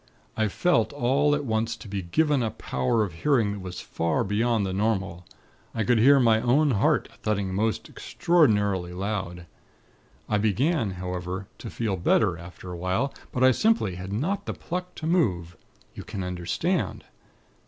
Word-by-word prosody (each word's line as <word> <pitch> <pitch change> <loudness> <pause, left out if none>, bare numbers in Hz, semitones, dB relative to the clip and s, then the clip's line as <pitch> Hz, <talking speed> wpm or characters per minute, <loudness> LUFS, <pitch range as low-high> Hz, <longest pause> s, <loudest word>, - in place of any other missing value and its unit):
I 110 -1 +1
felt 115 - +1
all 145 +3 +2
at 145 -1 -3
once 115 0 -1
to 115 - -12
be 100 -1 -3
given 145 - +1
a 115 - 0
power 65 - -1
of 95 -5 -4
hearing 115 - +1
that 100 - -5
was 90 -2 -7
far 80 -1 -1
beyond 110 +1 +1
the 95 - -3
normal. 95 -4 -1 0.5
I 110 - 0
could 115 +3 +3
hear 140 +5 +6
my 115 -3 +4
own 140 +5 +3
heart 100 - +2
thudding 100 -3 -1
most 110 +3 -1
extraordinarily 105 - +1
loud. 95 -2 -4 0.8
I 105 - +1
began, 115 - +1
however, 90 +1 -4
to 115 - -7
feel 110 -5 -2
better, 90 +1 +2
after 90 +2 -10
a 90 - -6
while; 95 +10 -1 0.2
but 130 - 0
I 130 - +7
simply 215 - +2
had 95 +2 -7
not 185 - -2
the - - -3
pluck 180 +1 -5
to 155 - -6
move. 95 - +1 0.4
You - - -8
can 100 -4 -5
understand? 90 - -2
105 Hz, 165 wpm, -26 LUFS, 95-130 Hz, 0.8 s, I